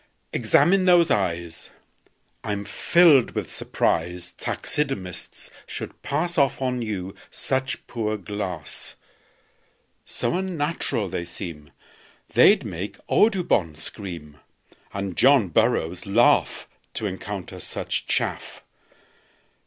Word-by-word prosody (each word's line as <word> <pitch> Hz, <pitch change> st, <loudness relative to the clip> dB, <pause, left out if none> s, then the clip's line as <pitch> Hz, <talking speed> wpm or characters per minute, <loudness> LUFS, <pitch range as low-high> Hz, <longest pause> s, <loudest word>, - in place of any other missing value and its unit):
"Examine 185 Hz, +1 st, +4 dB
those 175 Hz, -2 st, +5 dB
eyes. 85 Hz, -4 st, -1 dB, 0.7 s
I'm 105 Hz, -1 st, -3 dB
filled 145 Hz, -, +4 dB
with -, -, -3 dB
surprise 90 Hz, +2 st, -1 dB
Taxidermists 105 Hz, -, -3 dB, 0.2 s
should -, -, -7 dB
pass 170 Hz, +4 st, 0 dB
Off 140 Hz, -1 st, +2 dB
on 125 Hz, -2 st, -1 dB
you 95 Hz, -4 st, -4 dB, 0.2 s
such 130 Hz, 0 st, -2 dB
poor 110 Hz, -2 st, -2 dB
glass; 95 Hz, -6 st, -4 dB, 1.1 s
So -, -, -2 dB
unnatural 165 Hz, -, -1 dB
they 90 Hz, -1 st, -3 dB
seem 85 Hz, -4 st, -7 dB, 0.6 s
They'd -, -, +5 dB
make -, -, -5 dB
Audubon 175 Hz, -, +3 dB
scream, 80 Hz, -3 st, -8 dB, 0.5 s
And 100 Hz, -2 st, -4 dB
John 130 Hz, -7 st, +5 dB
Burroughs 90 Hz, -3 st, +1 dB
laugh 115 Hz, +5 st, +3 dB, 0.3 s
To -, -, -2 dB
encounter 95 Hz, -1 st, -5 dB
such -, -, -3 dB
chaff. -, -, -2 dB
105 Hz, 100 wpm, -24 LUFS, 90-140 Hz, 1.1 s, those